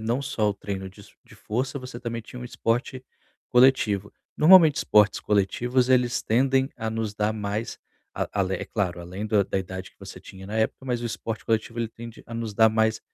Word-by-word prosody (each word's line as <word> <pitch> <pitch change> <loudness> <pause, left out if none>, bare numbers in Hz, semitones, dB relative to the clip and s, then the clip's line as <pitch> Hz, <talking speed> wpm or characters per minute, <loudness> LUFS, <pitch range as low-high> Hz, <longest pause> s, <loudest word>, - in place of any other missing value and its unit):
não 115 +4 -1
só 110 -5 -1
o - - -4
treino 95 -1 -5
disso 100 +1 -16
de - - -17
força, 130 +5 -3
você 125 -2 -8
também 115 -1 -4
tinha 125 +2 -11
um - - -6
esporte 120 +2 -2 0.4
coletivo. 125 -6 +3 0.2
Normalmente 160 -2 +7
esportes 105 -10 +3
coletivos, 120 +5 +1
eles 125 -1 +2
tendem 130 +3 +2
a 110 - -3
nos 110 -2 -3
dar 105 +1 0
mais, 105 +1 -4 0.4
a - - -2
alé 95 0 0
é - - -3
claro, 90 -5 -2
além 95 +5 -6
do 105 -1 +3
da 95 - -2
idade 95 0 -6
que - - -36
você - - -10
tinha 95 0 -12
na 105 +2 -5
época, 110 +4 -1
mas 125 -2 -2
o 120 - -1
esporte 110 0 -5
coletivo 115 +1 -1
ele 115 - -1
tende 115 0 -11
a 115 - -8
nos 115 -2 -4
dar 110 +1 +6
mais 110 0 +1
110 Hz, 205 wpm, -25 LUFS, 105-125 Hz, 0.4 s, Normalmente